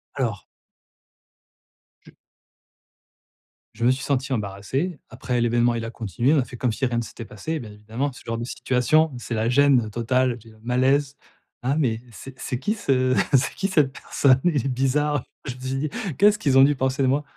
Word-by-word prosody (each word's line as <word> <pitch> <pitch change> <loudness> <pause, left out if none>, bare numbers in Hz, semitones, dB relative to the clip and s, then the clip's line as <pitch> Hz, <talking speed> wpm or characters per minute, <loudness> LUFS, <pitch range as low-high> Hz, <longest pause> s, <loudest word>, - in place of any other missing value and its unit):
Alors 115 -7 -2 1.6
Je - - -15 1.6
je 115 +2 -2
me 125 - +6
suis 130 0 -2
senti 135 -1 -1
embarrassé. 115 - -3
Après 125 -1 -2
l'événement 120 0 +2
il 115 -1 -3
a 115 - -5
continué, 120 - 0
on 155 - +4
a 130 - +2
fait 125 - -10
comme 125 0 0
si 130 - -1
rien 120 -2 -1
ne 120 - 0
s'était 115 +1 -9
passé. 155 +11 -5
Bien 115 -5 -9
évidemment 110 +7 -4
ce 125 - -14
genre 115 0 -3
de 115 - -4
situation, 135 +6 +2
c'est 120 - -6
la 110 0 0
gêne 130 -4 +4
totale, 120 +2 0
j'ai 110 0 -16
un 110 - -21
malaise. 135 +4 +1 0.5
Ah, 130 +3 +1
mais, 115 -7 0
c'est 135 +3 -11
c'est 125 - -3
qui 205 +10 0
ce 130 - +1 0.2
c'est 135 -1 +3
qui 195 - -1
cette 150 -8 +2
personne, 135 -1 +2
il 150 -8 +1
est - - +1
bizarre. 135 +2 +1 0.2
Je 135 - -4
dis: 135 +3 -3 0.3
«Qu'est-ce 205 +1 +5
qu'ils 135 -7 +2
ont 135 - +9
dû 145 +1 +4
penser 130 +1 -1
de - - +3
moi?» 140 +3 +1
130 Hz, 195 wpm, -24 LUFS, 120-140 Hz, 1.6 s, ont